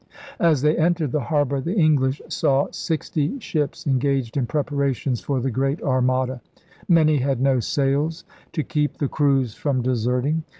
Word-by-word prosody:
As 155 -5 +3
they 150 +1 +3
entered 165 -4 +1
the 150 - 0
harbor, 140 -1 0
the 170 +8 -3
English 145 -6 +2
saw 135 0 +1
sixty 160 - -2
ships 150 - -3
engaged 135 -3 0
in 130 -4 0
preparations 140 -4 -1
for 140 -2 -1
the 130 +1 -1
Great 135 +6 0
Armada. 130 -1 0 0.5
Many 155 -3 +5
had 135 -1 0
no 135 -1 +2
sails 145 +7 0 0.2
— - - -30
to 155 - -1
keep 150 -1 -1
the 145 - 0
crews 135 -5 +1
from 130 -2 -1
deserting. 125 +5 0
140 Hz, 160 wpm, -22 LUFS, 130-150 Hz, 0.5 s, Many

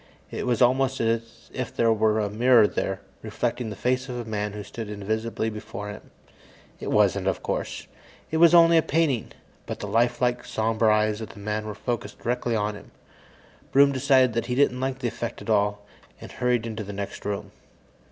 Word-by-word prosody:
It - - -4
was 120 -1 +3
almost 130 +1 +2
as 115 0 -2
if - - -4
there 115 -1 +3
were 110 0 +2
a 105 - 0
mirror 115 +2 +5
there, 95 -1 -2 0.2
reflecting 115 +2 -2
the 105 - -6
face 125 +4 -1
of 125 - -4
a 120 - -5
man 105 -2 -3
who 105 0 -6
stood 110 +1 -7
invisibly 110 +2 -2
before 105 -1 -7
it. 105 - -9 0.8
It - - -5
wasn't, - - +2
of - - -1
course; - - -3 0.5
it 160 - 0
was 170 +1 +7
only 170 0 +7
a - - +6
painting. 150 -6 0 0.4
But - - -4
the - - -5
lifelike, 120 +1 +1
somber 110 0 +1
eyes 105 0 +2
of 110 - -6
the 110 - -12
man 105 +1 -3
were 105 - -5
focused 105 -2 -4
directly 120 -1 -1
on 105 0 0
him. 100 - -12 0.8
Broom 140 +1 +6
decided 130 -4 +3
he 125 - -1
didn't 130 -2 +2
like 130 0 -2
the 130 -2 -2
effect 120 0 -5
at - - -4
all, 105 -1 +1 0.3
and - - -10
hurried 125 -2 0
into 110 -1 -4
the 100 0 -7
next 100 0 -6
room. 100 -1 -4
115 Hz, 190 wpm, -25 LUFS, 105-125 Hz, 0.8 s, was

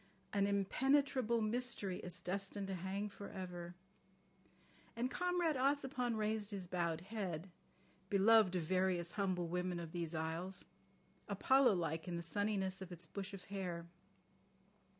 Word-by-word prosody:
"An 200 -1 +3
impenetrable 235 +4 +2
mystery 215 -4 0
is 180 -1 -3
destined 195 +2 -2
to - - -1
hang 190 +3 -2
for 200 0 -8
ever.... 175 -2 -6 0.6
" - - -30
And 245 +3 -1
Comrade 355 -3 +1
Ossipon 265 -3 +1
raised 215 -1 0
his 195 -4 -4
bowed 170 -2 0
head, 185 -4 -4 0.6
beloved 205 -1 +6
of 175 - +1
various 185 0 +1
humble 185 -4 0
women 180 +1 -1
of 165 -2 -6
these 170 -1 -2
isles, 165 +4 -2 0.6
Apollo 265 -5 +5
like 165 -1 -1
in 175 - -2
the 170 - -3
sunniness 195 +1 0
of 190 -1 -7
its 170 -1 -5
bush 195 +4 -5
of 195 -2 -8
hair. 175 -4 -3
190 Hz, 140 wpm, -38 LUFS, 175-220 Hz, 0.6 s, beloved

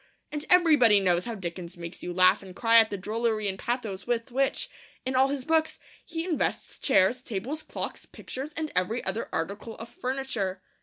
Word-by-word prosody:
And 300 0 -4
everybody 300 - +6
knows 180 -2 +2
how 235 -1 -4
Dickens 175 -2 -6
makes 170 +1 -8
you 180 - -4
laugh 185 +2 +5
and 190 -2 -11
cry 230 +1 +6
at 220 -1 +4
the 200 - -3
drollery 215 +2 -1
and 190 -1 -2
pathos 230 -5 -3
with 240 +1 -1
which, 270 +2 +1 0.4
in 260 0 -1
all 260 +1 +5
his 275 -2 -3
books, 320 -1 +2 0.3
he 330 0 -4
invests 340 -5 -2
chairs, 250 -1 +3
tables, 250 +7 -4
clocks, - - -4
pictures, 270 +4 -7
and 315 -2 -2
every 210 +7 0
other 230 - -2
article 200 +7 -4
of 225 +1 -8
furniture. 240 -8 -3
230 Hz, 185 wpm, -28 LUFS, 190-265 Hz, 0.4 s, everybody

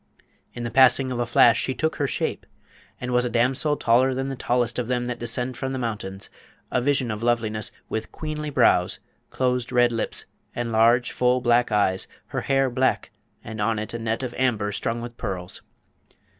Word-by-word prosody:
In 120 - -5
the 120 - -3
passing 130 0 +5
of 125 - -3
a 120 - -1
flash 120 -1 +5
she 130 - -2
took 160 0 -1
her 145 - 0
shape, - - -3 0.5
and 125 0 -4
was 125 0 +3
a 125 - -1
damsel 130 +5 +1
taller 125 +3 +3
than 135 +1 -2
the 135 - -4
tallest 120 -1 0
of 120 - -2
them 125 -1 -1
that 125 -1 -4
descend 125 +1 -2
from 135 0 -3
the - - -2
mountains, 105 -5 -5 0.4
a 125 - +1
vision 135 -2 +1
of 105 0 -5
loveliness, 110 -3 0 0.2
with 110 0 -4
queenly 155 -1 -5
brows, 90 -10 +3 0.3
closed 125 -1 -1
red 120 -1 +4
lips, 115 -1 -3 0.3
and 120 -1 -2
large 115 +2 +4
full 125 0 +2
black 120 -1 +2
eyes; 95 -3 +1 0.2
her - - -2
hair 135 -1 +2
black, 130 +1 0 0.3
and 110 -2 -6
on 110 +1 +1
it 110 +2 -5
a 115 - -4
net 115 +2 -2
of 125 -2 -4
amber 110 -6 +1
strung 115 +3 -2
with 120 0 -8
pearls. 95 -5 -5
120 Hz, 195 wpm, -24 LUFS, 115-130 Hz, 0.5 s, passing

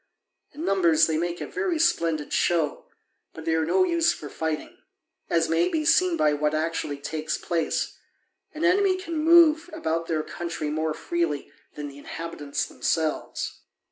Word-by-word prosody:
In 315 +3 -5
numbers 170 -5 +4
they 160 - -1
make 175 +1 -3
a - - -2
very 375 -4 -1
splendid 165 - +1
show, 165 -4 +1 0.5
but 160 - -9
they 165 - +1
are 160 -1 +1
no 370 - +4
use 335 -2 +3
for 145 - -7
fighting; 160 0 -4 0.5
as 165 -1 +2
may 165 +2 +2
be 310 -1 -1
seen 365 +2 +4
by 150 -1 +3
what 150 +1 0
actually 155 -2 -2
takes 155 +2 -3
place: 165 -3 -2 0.5
an 310 +3 -2
enemy 375 +1 +4
can 335 -3 -6
move 325 +1 +5
about 165 - -2
their 155 -2 0
country 170 -3 -4
more 155 0 -1
freely 165 -5 -2 0.2
than 150 -1 -5
the 140 0 -11
inhabitants 150 -2 -4
themselves. 160 -2 -2
165 Hz, 160 wpm, -25 LUFS, -, 0.5 s, move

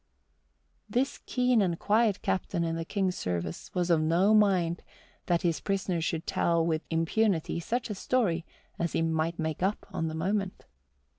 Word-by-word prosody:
This 260 +3 0
keen 250 -3 +3
and 175 -4 +1
quiet 215 0 +2
captain 175 -2 -1
in 165 0 -1
the 165 - -2
King's 190 +1 -1
service 85 -2 -3
was 180 -1 +1
of 160 -2 +4
no 175 +7 +3
mind 185 -5 +3 0.5
that 175 +1 +1
his 170 -2 +1
prisoner 190 -3 -1
should 165 0 -2
tell 170 -1 +1
with 160 -2 0
impunity 165 +1 +1
such 235 +8 -2
a 210 - -3
story 195 -5 0 0.4
as 170 -1 -1
he 165 - +1
might 165 +1 0
make 160 -1 -3
up 195 +3 0
on 165 - -1
the 160 - -4
moment. 190 +3 -2
175 Hz, 165 wpm, -29 LUFS, 165-200 Hz, 0.5 s, of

